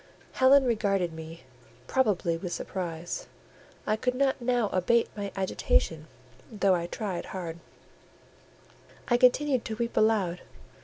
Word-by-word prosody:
Helen 270 +1 +5
regarded 195 -7 0
me, 160 -2 -9 0.4
probably 200 - +1
with 175 +1 -5
surprise: 175 -3 -5 0.6
I 215 - +1
could 250 +3 -1
not 270 0 +1
now 240 -3 +1
abate 230 +6 +2
my 200 -1 -4
agitation, 165 -4 0 0.4
though 200 -3 +2
I 170 -1 -1
tried 190 -2 -4
hard; 170 -3 -6 1.5
I 240 - +4
continued 255 +1 +3
to 220 - -4
weep 235 +1 -3
aloud. 205 -5 +2
200 Hz, 120 wpm, -28 LUFS, 175-240 Hz, 1.5 s, Helen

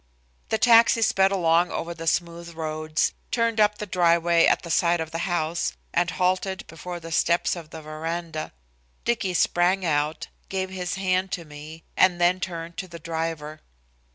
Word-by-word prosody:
The 220 - +1
taxi 230 0 +5
sped 195 -2 +3
along 175 -2 +3
over 170 +1 -4
the 165 -1 -8
smooth 170 0 -1
roads, 155 0 -1 0.2
turned 230 -2 0
up 210 0 +4
the 210 - -5
driveway 170 -2 +3
at - - +2
the 170 - -5
side 170 +1 +3
of 160 -1 -4
the 170 +3 -3
house 170 -1 -1 0.2
and 175 0 +2
halted 185 +4 -1
before 175 +2 -7
the 165 0 -9
steps 170 +2 +2
of 165 -3 -9
the 160 0 -9
veranda. 160 +1 -5 0.5
Dicky 200 -6 0
sprang 180 +2 +2
out, 150 -1 0 0.2
gave 190 -1 -2
his 180 -1 -3
hand 185 0 0
to 170 -3 -4
me, 150 +2 -11
and 180 -2 +4
then 175 +1 +3
turned 170 -2 -6
to 190 - -4
the 170 -1 -9
driver. 160 -2 -4
170 Hz, 170 wpm, -25 LUFS, 165-185 Hz, 0.5 s, taxi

